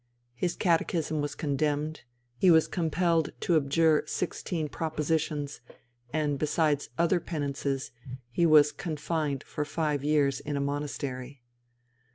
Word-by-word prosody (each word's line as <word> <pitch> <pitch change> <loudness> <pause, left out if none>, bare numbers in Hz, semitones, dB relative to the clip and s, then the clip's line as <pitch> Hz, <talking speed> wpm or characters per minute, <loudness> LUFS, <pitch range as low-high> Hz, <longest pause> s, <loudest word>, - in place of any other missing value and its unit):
His 175 +8 -1
catechism 165 -3 +1
was 145 - -3
condemned; 150 0 -1 0.3
he 185 - +5
was 160 -2 +6
compelled 165 -1 +1
to 175 - +2
abjure 155 +1 +3
sixteen 165 -2 -2
propositions, 150 -2 -2 0.5
and 150 -2 0
besides 150 -1 +1
other 170 +1 +3
penances 140 -4 -3 0.4
he 170 +7 +3
was 150 -2 +7
confined 155 -4 -2
for 150 - -3
five 150 -2 -1
years 145 -3 +2
in 145 -1 -3
a - - 0
monastery. 140 -2 -4
150 Hz, 120 wpm, -29 LUFS, 145-160 Hz, 0.5 s, was